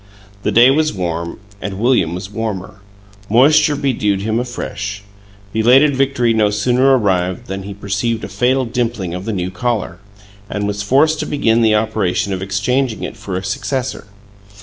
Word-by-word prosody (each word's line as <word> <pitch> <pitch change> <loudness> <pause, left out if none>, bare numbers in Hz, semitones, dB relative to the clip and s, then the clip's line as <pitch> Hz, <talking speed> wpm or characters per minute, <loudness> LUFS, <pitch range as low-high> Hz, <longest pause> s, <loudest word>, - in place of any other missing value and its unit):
The - - 0
day 120 +3 +6
was 155 +2 +1
warm 85 -2 -4 0.2
and 100 -2 -4
William 105 -7 +2
was 95 +2 -7
warmer; 100 -4 -5 0.5
moisture 150 +6 +5
bedewed 110 -9 0
him 110 +2 0
afresh. 105 -4 -5 0.5
Belated 130 +6 +4
victory 130 -3 +1
no 110 -2 +3
sooner 125 +6 +3
arrived 95 -5 0
than 95 +1 -5
he 100 +1 -7
perceived 100 +3 -2
a - - -4
fatal 125 +6 +1
dimpling 115 -7 -2
of 90 +2 -5
the 115 - -2
new 90 -3 -3
collar, 110 -6 -2 0.5
and 105 -1 -2
was 100 0 -2
forced 145 +9 +3
to - - -3
begin 115 -5 +2
the 110 -2 +4
operation 105 -3 0
of 95 - -4
exchanging 110 +6 -1
it - - -5
for 95 -2 -5
a 95 - -4
successor. 125 +5 -3
110 Hz, 165 wpm, -17 LUFS, 95-125 Hz, 0.5 s, day